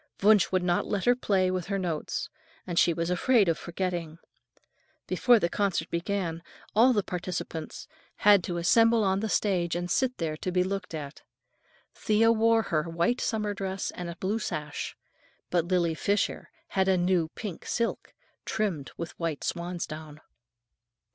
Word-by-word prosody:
Wunsch 210 -1 +5
would 185 -1 +1
not 175 -1 +1
let 200 -3 -1
her 245 - +6
play 190 -6 +1
with 185 -2 -3
her 200 0 -1
notes, 175 -5 -3 0.4
and 175 -2 0
she 170 - +5
was 165 +1 -2
afraid 215 +3 +3
of 165 - +3
forgetting. 170 -2 -4 0.9
Before 245 -1 +4
the 170 - +1
concert 185 -3 -1
began, 170 -1 -2 0.3
all 240 +4 +6
the 210 -5 +1
participants 175 -3 -5 0.3
had 205 -3 +5
to 175 - -3
assemble 225 +6 +4
on 190 -1 +2
the 220 +1 -2
stage 175 -6 +1
and 175 0 -3
sit 255 -1 +1
there 160 -2 -2
to 185 - -3
be 180 0 +2
looked 185 -2 -4
at. 145 -2 -7 0.7
Thea 220 +2 +3
wore 225 0 +3
her 160 -3 -1
white 170 +9 0
summer 210 -3 -1
dress 195 -1 -3
and 175 -1 -6
a 170 - -6
blue 195 +6 -1
sash, 150 -7 -4 0.5
but 175 -2 +2
Lily 175 -2 +1
Fisher 200 +5 -1 0.2
had 190 -1 +1
a 190 -1 +4
new 175 -2 +2
pink 200 -7 -6
silk, 235 -1 -2 0.3
trimmed 185 - -2
with 170 -1 -5
white 165 -4 -2
swansdown. 160 -3 -5
185 Hz, 160 wpm, -28 LUFS, 170-205 Hz, 0.9 s, her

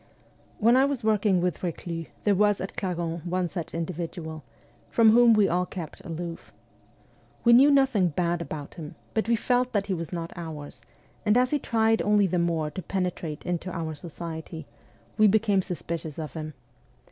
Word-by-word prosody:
When 230 +3 +4
I 260 - +5
was 275 -3 -1
working 210 -4 +2
with 180 -3 -1
Reclus 170 -1 -4 0.2
there 205 - +3
was 205 +1 +3
at 190 - -5
Clarens 170 -3 -3
one 180 +1 -1
such 170 -2 -6
individual, 165 -2 -5 0.5
from 225 -2 +5
whom 235 0 +7
we 210 -2 +4
all 180 +1 0
kept 170 -5 -8
aloof. 170 -1 -6 0.9
We 235 - +6
knew 265 +4 +8
nothing 270 -9 +4
bad 170 +1 -1
about 150 -3 -6
him, 155 -4 -9 0.2
but 220 +1 0
we 235 - +4
felt 250 +2 +1
that 200 -2 +1
he 200 - -1
was 165 -3 -4
not 170 -2 -5
' - - -27
ours,' 155 -6 -7 0.4
and 210 +2 +3
as 250 0 +3
he 295 - +2
tried 225 -2 +2
only 210 -1 +3
the 180 -1 0
more 165 -3 0
to 185 - -5
penetrate 180 -5 -3
into 175 0 -2
our 165 -2 -3
society, 160 0 -7 0.5
we 215 - +7
became 205 -1 +3
suspicious 165 -4 -5
of 155 -2 -5
him. 155 -2 -6
180 Hz, 180 wpm, -26 LUFS, 165-215 Hz, 0.9 s, knew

